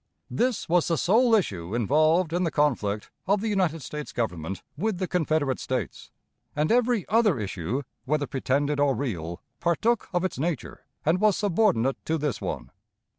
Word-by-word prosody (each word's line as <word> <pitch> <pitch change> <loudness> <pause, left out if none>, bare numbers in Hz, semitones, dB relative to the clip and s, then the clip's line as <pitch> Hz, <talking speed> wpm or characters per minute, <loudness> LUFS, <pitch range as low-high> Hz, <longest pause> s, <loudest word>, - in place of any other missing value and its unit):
This 245 -4 0
was 175 0 +3
the 165 - +1
sole 225 - +4
issue 95 - -1
involved 155 - +3
in 180 +1 +1
the 170 - +1
conflict 115 -10 0 0.2
of 200 +2 +3
the 220 +2 -2
United 175 -7 0
States 150 +3 -6
Government 95 -6 -3
with 200 +5 -1
the 185 0 -2
Confederate 155 -6 0
States; 125 - -4 0.5
and 150 +4 +1
every 240 -4 +2
other 210 - +3
issue, 100 - -3 0.2
whether 145 +1 +1
pretended 140 +2 0
or 145 -2 +3
real, 85 - -4 0.2
partook 215 +7 +1
of 175 -1 0
its 185 - -3
nature, 160 -2 -3 0.2
and 170 +5 +2
was 215 -3 +4
subordinate 175 - +1
to 160 - 0
this 145 -7 -2
one. - - -4
155 Hz, 165 wpm, -26 LUFS, 130-185 Hz, 0.5 s, sole